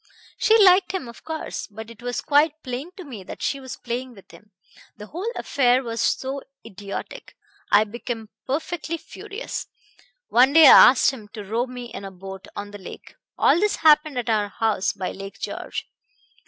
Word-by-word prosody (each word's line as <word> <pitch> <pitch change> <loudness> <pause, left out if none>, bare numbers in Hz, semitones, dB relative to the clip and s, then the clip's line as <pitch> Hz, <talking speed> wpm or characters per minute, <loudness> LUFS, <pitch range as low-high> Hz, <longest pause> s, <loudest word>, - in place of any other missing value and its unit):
She 445 - +5
liked 385 -2 +5
him, 370 -10 -3
of 235 - -12
course; 320 -1 -5
but 220 +2 -10
it 230 - -15
was 245 0 -3
quite 300 +2 +2
plain 255 +6 -5
to 370 - -8
me 250 - -9
that - - -9
she 275 - -1
was 260 -1 -8
playing 245 +1 -5
with 195 - -17
him. 210 - -17 0.5
The 210 - -9
whole 365 - -4
affair 255 -1 +2
was 230 -1 -3
so 270 +1 -1 0.2
idiotic, 200 +1 -8 0.4
I 205 +1 +6
became 225 0 -6 0.2
perfectly 320 +4 -3
furious. 410 +7 -7 0.6
One 255 +4 +5
day 325 0 +9
I - - +10
asked 260 - +3
him 225 -6 -10
to 210 - -7
row 225 +5 -1
me 245 -1 -8
in - - -7
a 195 - -6
boat 190 +1 -10
on 205 0 -6
the 205 - -9
lake 190 - -11 0.2
all - - +4
this 420 +2 +2
happened 305 -3 +4
at 245 - -2
our 215 -2 +1
house 210 -1 0
by 185 - -4
Lake 195 0 -9
George. - - -5
245 Hz, 185 wpm, -23 LUFS, 210-300 Hz, 0.6 s, I